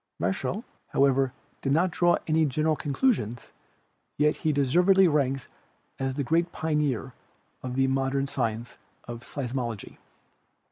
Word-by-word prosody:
Michell, 130 - -1 0.2
however, 135 -1 +3 0.3
did 135 - -1
not 175 +4 +3
draw 175 +1 +3
any 160 0 +3
general 155 +2 +1
conclusions, 140 - -1 0.7
yet 150 +1 +3
he 155 - 0
deservedly 180 +8 +4
ranks 135 -4 0 0.5
as 135 -1 -1
the 140 - -1
great 170 +5 +1
pioneer 150 -6 -1 0.5
of 125 -1 -5
the 135 0 +3
mod 135 0 0
ern 135 0 +1
science 115 -4 -3 0.3
of 120 -1 -6
Seismology. 120 -4 -5
135 Hz, 130 wpm, -27 LUFS, 130-155 Hz, 0.7 s, deservedly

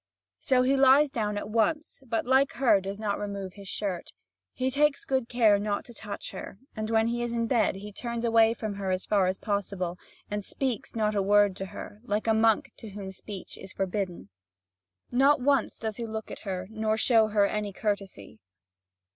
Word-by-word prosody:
So 255 -1 +3
he 265 +2 +3
lies 270 +2 +6
down 210 -5 -1
at - - -4
once, 275 +9 0
but 230 -1 -1
like 265 +2 +3
her, 245 -4 +4
he - - -3
does 195 +1 -5
not 210 -2 -2
remove 200 -2 -5
his 200 -1 -11
shirt. 190 -3 -4 0.4
He 260 0 -1
takes 290 +1 +2
good 260 -3 0
care 220 -4 +4
not 205 0 -2
to 240 - -11
touch 210 -2 -6
her; 190 0 -8 0.2
and 215 -1 -3
when 225 0 +3
he 240 0 -1
is 240 0 -2
in 230 -1 0
bed, 225 -5 +2
he 205 +2 -8
turns 235 +1 -3
away 225 0 +4
from 215 -3 -4
her 195 -1 -3
as 185 0 -1
far 200 -3 +3
as 185 +1 -1
possible, 195 -4 -2 0.3
and 205 0 -3
speaks 255 +1 -3
not 215 -1 +1
a 200 - +1
word 205 0 +4
to 195 - -4
her, 205 - -9
like 210 -3 -1
a 225 - +3
monk 220 0 +3
to 220 - -9
whom 195 -1 -7
speech 190 0 -8
is 190 - -10
forbidden. 185 - -3 0.8
Not 275 +4 +4
once 275 +2 +1
does 220 -1 -4
he 235 -1 -4
look 220 0 -5
at - - -9
her, 185 -1 -3
nor 220 0 0
show 225 -1 +4
her 210 -1 +3
any 210 0 -2
courtesy. 195 - -4
215 Hz, 205 wpm, -28 LUFS, 200-235 Hz, 0.8 s, lies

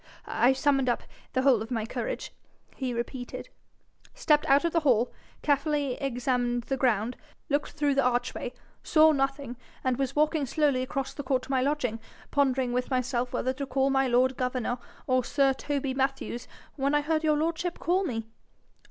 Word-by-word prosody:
'I 250 +2 +3
summoned 270 -1 +2
up 240 - 0 0.3
the 260 - +1
whole 260 -5 +5
of 220 - -5
my 225 -4 -1
courage,' - - -4 0.4
he 260 -2 -2
repeated, 245 +1 -5 0.7
'stepped 300 -12 +2
out 280 +4 +5
of 335 - 0
the 335 - +4
hall, 250 -6 +2 0.3
carefully 290 -2 +1
examined 245 -2 0
the 270 - -2
ground, 245 -2 +1 0.3
looked 290 0 0
through 295 -2 +1
the 275 - +3
arch 245 0 +1
way, 245 - -5 0.3
saw 315 0 +5
nothing, 275 -3 -1 0.3
and 255 -2 +1
was 270 -2 -1
walking 305 -1 +2
slowly 285 -2 +2
across 270 0 -3
the - - -5
court 260 -1 0
to - - -7
my 260 -1 +2
lodging, 260 -5 0 0.3
pondering 260 -3 +2
with 250 0 -1
myself 250 -1 0
whether 260 - -1
to 275 +1 -5
call 270 0 +1
my 270 0 +3
lord 255 +2 +3
governor 250 -1 -1 0.3
or 255 -1 +2
sir 275 +1 +2
Toby 275 -1 -2
Mathews, 265 -2 -2 0.3
when 280 +1 +1
I 295 - +4
heard 315 +1 0
your 305 -1 +3
lordship 335 +2 -1
call 365 +3 +1
me.' 225 - -3
270 Hz, 180 wpm, -28 LUFS, 250-290 Hz, 0.7 s, whole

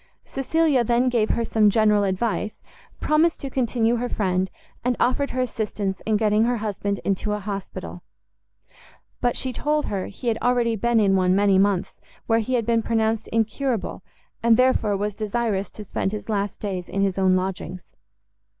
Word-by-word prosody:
Cecilia 280 -1 +1
then 240 +2 +2
gave 230 -3 +1
her 230 - 0
some 215 -2 +3
general 210 -1 +3
advice, 205 +2 -1 0.4
promised 315 +2 +2
to 275 - -5
continue 240 -2 +1
her 245 +1 -2
friend, 185 -2 0 0.3
and 250 0 +1
offered 265 +3 +1
her 255 - -1
assistance 210 -5 -3
in 215 -1 +3
getting 215 +1 +3
her 245 0 +1
husband 205 -2 -2
into 200 +2 0
an 210 - -3
hospital; 200 -1 -6 1.2
but 245 -1 0
she 260 -1 -2
told 300 +4 0
her 195 -2 -3
he 240 +5 -8
had 225 - -1
already 245 -2 +2
been 235 +2 +2
in 195 -2 +3
one 185 -1 +3
many 200 -1 +4
months, 195 -2 0 0.2
where 225 0 +3
he 250 +3 -1
had 230 -3 0
been 230 0 +2
pronounced 220 -1 0
incurable, 230 0 -1 0.4
and 230 -1 +5
therefore 240 -5 +3
was 205 +1 -2
desirous 215 -1 -1
to 215 - -9
spend 195 0 -2
his 215 +1 -6
last 200 -2 -1
days 185 -4 -4
in 195 +1 0
his 195 -1 0
own 185 -1 +4
lodgings. 185 -1 -4
220 Hz, 175 wpm, -23 LUFS, 200-240 Hz, 1.2 s, and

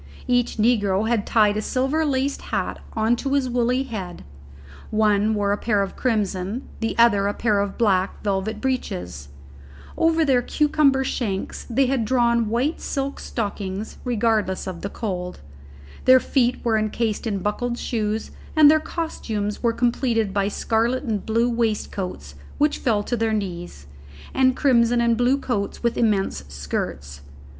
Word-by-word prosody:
Each 245 -1 +1
negro 215 -3 +2
had 230 -3 0
tied 210 -2 +3
a - - 0
silver 270 +8 0
laced 275 -1 -1
hat - - -2
on 225 +1 +2
to 275 +3 -2
his 275 -2 +2
woolly 250 +1 +1
head; 200 -9 -6 0.7
one 215 0 +2
wore 200 -1 +1
a 205 - +1
pair 210 -4 +1
of 195 - -6
crimson, 210 -1 -1
the 225 - -2
other 205 -4 +4
a 205 - -2
pair 215 -3 +1
of 200 -1 -2
black, 195 -5 +1
velvet 205 +1 -1
breeches; 90 - -3 0.7
over 325 0 +3
their 260 -4 +3
cucumber 290 -1 +2
shanks 210 -7 -3
they 265 +3 +3
had 260 -2 0
drawn 235 -1 +2
white 250 +8 0
silk 275 0 -3
stockings, 205 -2 -4
regardless 220 -5 0
of 180 -3 -6
the 200 - -4
cold; 180 -5 -5 0.6
their 260 0 +8
feet 250 -2 0
were 220 -2 +3
encased 215 +1 -1
in 205 -3 -1
buckled 235 +5 -2
shoes, 220 -2 -2 0.2
and 305 -2 +8
their 315 - +4
costumes 220 -11 -4
were 235 - +2
completed 235 -3 0
by 200 -1 +1
scarlet 230 +5 0
and 220 -6 -3
blue 230 +2 +2
waistcoats 210 - -2 0.2
which 295 0 +1
fell 215 -4 +1
to 240 - -2
their 225 -1 0
knees, 175 - -4 0.5
and 260 -1 +3
crimson 240 -4 +3
and 235 -1 +3
blue 245 +3 +2
coats 210 -7 -3
with 235 0 +1
immense 200 - 0
skirts. 70 0 -5
225 Hz, 155 wpm, -23 LUFS, 200-250 Hz, 0.7 s, their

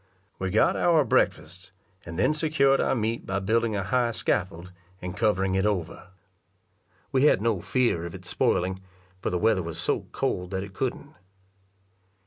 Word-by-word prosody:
We 95 - -2
got 105 +4 +3
our 165 -4 +3
breakfasts, 90 -2 -1 0.3
and 85 0 -7
then - - +3
secured 155 -3 +2
our - - +1
meat 115 0 -2
by 95 - -1
building 110 +3 +1
a 100 - -1
high 120 +4 +1
scaffold, 90 -5 -1 0.3
and 90 0 -6
covering 100 -3 +1
it 95 0 +1
over. 90 -4 -2 1.0
We 135 +1 +3
had 150 - +5
no 110 -4 0
fear 120 -10 0
of 85 - -9
its - - -10
spoiling, 95 +1 0 0.4
for - - -1
the 90 - -1
weather 105 0 +2
was 85 -1 -6
so - - -1
cold 90 0 -2
that 95 0 -3
it 100 -1 -10
couldn't. 135 +6 -4
100 Hz, 165 wpm, -26 LUFS, 90-120 Hz, 1.0 s, had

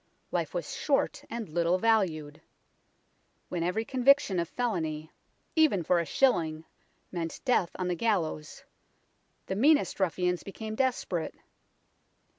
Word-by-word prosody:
Life - - -2
was - - -3
short - - 0
and 230 -2 -4
little 170 +3 +1
valued. 180 -9 +1 1.1
When 175 - -2
every 180 +6 0
conviction 260 -6 +3
of 170 -1 -2
felony, 160 -10 -2 0.4
even 305 - +4
for 175 +2 +3
a 170 - -2
shilling, 160 - +1 0.5
meant 165 -2 -4
death 245 -9 +3
on 185 - -2
the 180 - +1
gallows, 170 -6 -1 0.8
the 190 - -3
meanest 290 +5 +3
ruffians 180 -1 0
became 215 +2 -7
desperate. 220 -9 -1
185 Hz, 120 wpm, -29 LUFS, 165-230 Hz, 1.1 s, even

